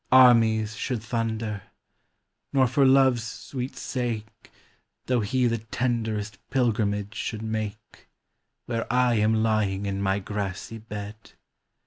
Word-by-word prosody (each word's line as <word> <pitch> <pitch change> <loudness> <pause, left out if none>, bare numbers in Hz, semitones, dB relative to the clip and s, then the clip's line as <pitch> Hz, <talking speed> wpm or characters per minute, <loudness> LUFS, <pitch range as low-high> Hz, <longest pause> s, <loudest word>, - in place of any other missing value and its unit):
Armies 115 -4 +6
should 120 -1 -3
thunder; 110 -3 -2 0.9
nor 135 -2 +4
for 135 +2 +3
Love's 130 -2 +5
sweet 125 +2 -6
sake, 115 -4 -4 0.5
Though 125 -1 +2
he 125 +4 +1
the 115 -1 +1
tenderest 110 -3 -2
pilgrimage 105 -5 0
should 110 -2 -4
make 110 -1 -5 0.6
Where 115 -1 -2
I 125 -1 +3
am 110 +1 +3
lying 105 -3 +1
in 100 0 -2
my 95 0 +1
grassy 100 +2 -4
bed. 105 0 -8
110 Hz, 115 wpm, -26 LUFS, 105-120 Hz, 0.9 s, Armies